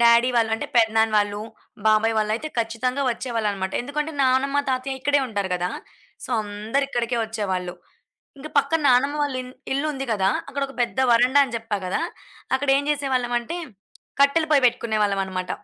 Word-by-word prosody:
Daddy 235 +1 +6
వాళ్ళు 225 -1 +2
అంటే 225 - -4
పెదనాన్న 220 -1 +3
వాళ్ళు, 205 0 +1 0.5
బాబాయ్ 215 +1 +4
వాళ్ళయితే 215 +8 -1
ఖచ్చితంగా 230 +4 -1
వచ్చేవాళ్ళు 230 -3 -1
అన్నమాట. 190 -1 -4
ఎందుకంటే 300 +4 -3
నాన్నమ్మ, 270 +2 +2
తాతయ్య 265 +1 -2
ఇక్కడే 285 +2 +2
ఉంటారు 200 -5 -3
గదా! 180 0 -1 0.5
సో, - - -9
అందరూ 215 +6 -2
ఇక్కడికే 240 -2 -1
వచ్చేవాళ్ళు. 190 -5 -3 0.6
ఇంకా 305 +3 -8
పక్కన 325 +3 +2
నానమ్మ 275 +4 +3
వాళ్ళ 285 -2 -1
ఇ - - -10 0.3
ఇల్లుంది 275 -1 -2
గదా! 195 -2 +2 0.2
అక్కడొక 275 0 -3
పెద్ద 240 +2 -3
వరండా 255 +4 +5
అని 250 -3 -4
చెప్పా 225 -2 -3
గదా! 185 - -1 0.5
అక్కడ 275 +1 -4
ఏం - - -1
చేసేవాళ్ళం 260 -4 0
అంటే 335 +9 -5 0.6
కట్టెల 310 +3 +3
పొయ్యి 280 -3 +4
పెట్టుకునేవాళ్ళం 215 -4 0
అన్నమాట. 185 -1 -5
240 Hz, 155 wpm, -23 LUFS, 215-275 Hz, 0.6 s, Daddy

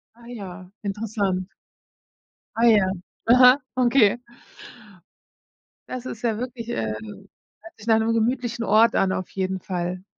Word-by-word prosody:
Ah 235 0 -17
ja, 195 -6 -9
interessant. 200 -2 -2 1.1
Ah 230 +1 +2
ja, 210 -4 +5 0.5
aha, 250 +1 +8 0.2
okay. 240 -3 +4 1.7
Das 255 -1 -6
ist 225 -4 -7
ja 225 -3 0
wirklich 240 -1 -6
ähm, 110 - -2 0.7
hört 335 - -15
sich 215 +1 -14
nach 225 -1 +4
'nem 225 +1 +1
gemütlichen 235 +1 -1
Ort 220 +2 +4
an 190 - +2
auf 185 -1 -3
jeden 190 0 -2
Fall. 180 0 -4
220 Hz, 130 wpm, -23 LUFS, 190-240 Hz, 1.7 s, aha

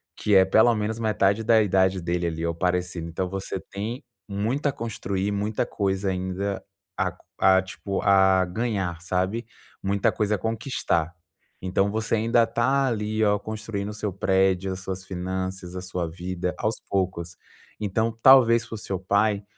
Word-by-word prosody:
que 105 - +1
é 95 0 +7
pelo 110 +5 +5
menos 110 +1 -2
metade 110 -1 +2
da 110 0 +5
idade 95 -1 +2
dele 85 0 -1
ali, 80 0 -3
ou 85 0 -1
parecido. 90 -1 -1
Então 90 +3 -2
você 95 +1 -4
tem 110 +10 -6 0.2
muito 115 +9 -1
a - - +2
construir, 100 -4 -3
muita 105 +1 -1
coisa 95 -1 -1
ainda 95 +1 -3 0.3
a - - 0
co - - -24
a 95 0 +5
tipo 95 +1 -4
a 95 -1 +5
ganhar, 95 -4 -2
sabe? 95 +6 -1 0.4
Muita 100 +1 +2
coisa 105 0 0
a - - -3
conquistar. 110 - -1 0.5
Então 95 +2 +1
você 110 +1 0
ainda 115 +2 +3
está 125 +4 +1
ali, 110 -2 -1
ó, 105 -1 +3
construindo 110 -1 -5
o - - -5
seu 105 -2 -3
prédio, 95 0 +1
as 95 - -4
suas 95 0 -5
finanças, 95 0 -4
a 90 - -4
sua 90 -2 -3
vida 90 +1 -4
aos 110 +1 0
poucos. 90 -3 -2 0.4
Então 110 +2 -1
talvez 120 -3 +7
pro 115 - -7
seu 100 -2 -4
pai, 100 +2 +1
100 Hz, 165 wpm, -25 LUFS, 95-110 Hz, 0.5 s, é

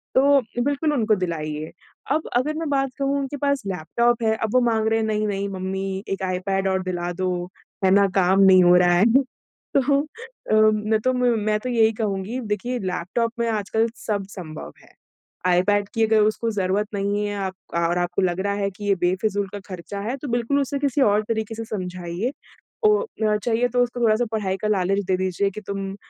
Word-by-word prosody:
तो 280 +1 +5 0.2
बिल्कुल 285 +2 0
उनको 220 -5 +2
दिलाइए। 155 -4 -4 0.4
अब 310 +2 0
अगर 295 +5 0
मैं 325 -2 -3
बात 275 -1 +1
कहूँ 275 +1 +1
उनके 275 +1 -4
पास 280 0 0
लैपटॉप 235 +7 0
है, 220 0 +2
अब 220 0 -3
वो 255 - +5
माँग 220 -1 +1
रहे 225 0 +2
हैं 220 - 0
नहीं-नहीं 210 -2 -1
मम्मी 190 +1 -4
एक 195 0 -3
आईपैड 195 +1 -1
और 190 -1 0
दिला 175 -1 -3
दो, 185 +1 -1 0.5
है 185 - +4
ना 200 0 +5
काम 190 +1 +4
नहीं 185 -1 +7
हो 175 0 +6
रहा 180 -1 +4
है। 200 - +5 0.7
तो - - +6 0.2
अ, 460 - -7 0.2
मैं 215 +1 0
तो 255 - +3
मैं 225 -4 +1
तो 255 - -5
यही 225 -2 +3
कहूँगी 205 +4 -2
देखिए 245 +5 -4
लैपटॉप 190 +4 -2
में 235 0 0
आज 210 -2 -2
कल 225 +1 +2 0.2
सब 205 -2 -1
संभव 155 -4 -8
है। - - -21 0.5
आईपैड 200 +3 +2
की 225 0 +3
अगर 220 -1 +3
उसको 215 +2 +1
जरूरत 195 +3 0
नहीं 205 +1 -1
है 205 0 -3
अब 190 - -5 0.3
और 175 +1 +1
आपको 175 +2 -1
लग 180 0 0
रहा 200 +1 0
है 200 -1 -1
कि 205 +2 -10
ये 200 -1 +3
बेफिजूल 195 +3 0
का 205 - -6
खर्चा 185 +2 -6
है 235 +6 -3
तो 285 - -7
बिल्कुल 240 +4 +1
उसे 280 +1 -2
किसी 280 -1 0
और 210 -2 +3
तरीके 220 -1 -2
से 225 0 -5
समझाइए 185 +2 -4 0.5
ओ, 425 +2 +4 0.2
या 210 -1 +3
चाहिए 235 +2 +1
तो 245 +1 0
उसको 245 0 -6
थोड़ा-सा 230 +1 +3
पढ़ाई 195 -3 -1
का 215 - -1
लालच 195 0 +1
दे 185 -1 +2
दीजिए 190 +1 0
कि 215 - -8
तुम 195 -1 -4
अ, 195 - -9
210 Hz, 205 wpm, -23 LUFS, 190-235 Hz, 0.7 s, नहीं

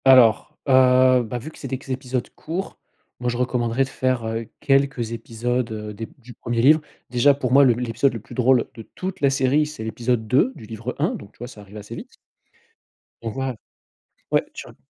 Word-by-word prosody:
Alors, 125 -5 +6
heu, 130 -1 +6
bah, 120 +2 -4
vu 145 +7 -7
que - - -16
c'est 135 - -6
des 130 - -2
q 135 0 -9
épisodes 130 -1 -2
courts, 175 +5 -5 0.4
moi 125 0 -1
je 120 - -2
recommanderais 125 0 +1
de 135 - -5
faire 130 -3 -1 0.3
quelques 135 -4 +1
épisodes, 115 +1 -2
heu, 105 -1 -5
des 115 +2 -6
du 125 -1 -13
1er 120 +1 -3
livre. 155 +4 +6 0.3
Déjà 135 +3 +5
pour 130 -3 -2
moi, 140 +1 +8
le 125 - +5
l'épisode 120 +2 0
le - - -4
plus 105 - -13
drôle 125 -1 +3
de 115 - -9
toute 190 0 -5
la 140 - +5
série, 135 +2 +2
c'est 150 -7 -7
l'épisode 115 0 -1
2 135 - +3
du - - -11
livre 115 +3 -6
1, - - +1
donc 100 - -9
tu - - -28
vois, 120 - -7
ça 110 -4 -12
arrive 100 +1 -12
assez 105 +3 -8
vite - - -9 1.1
on 115 - -3
voit 135 +1 -3 0.8
ouais, - - +3
tu - - -8
r - - -15
125 Hz, 210 wpm, -23 LUFS, 115-135 Hz, 1.1 s, moi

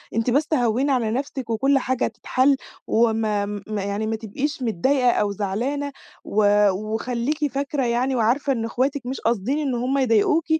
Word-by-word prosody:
أنتِ 230 +2 +1
بس 285 +5 +2
هوّني 250 +1 +2
على 235 -5 +1
نفسِك، 265 0 -4
وكلّ 270 +5 +2
حاجة 260 -1 0
هتتحل، 270 +2 +1 0.3
وما 220 -2 +1 0.2
ما 210 -2 -3
يعني 200 +2 -2
ما 225 - -1
تبقيش 260 +7 -4
متضايقة 250 +4 +2
أو 205 -3 0
زعلانة، 240 +9 -2 0.3
و 205 0 +3
وخليكِ 235 +8 -2
فاكرة 275 0 -1
يعني 245 +3 0
وعارفة 250 +5 +2
إن 225 -3 -2
أخواتِك 260 +3 -1
مش 260 +2 -4
قاصدين 235 +4 0
إن 275 -4 -1
هُم 255 +3 0
يضايقوكِ، 260 +5 +3
245 Hz, 160 wpm, -23 LUFS, 220-275 Hz, 0.3 s, و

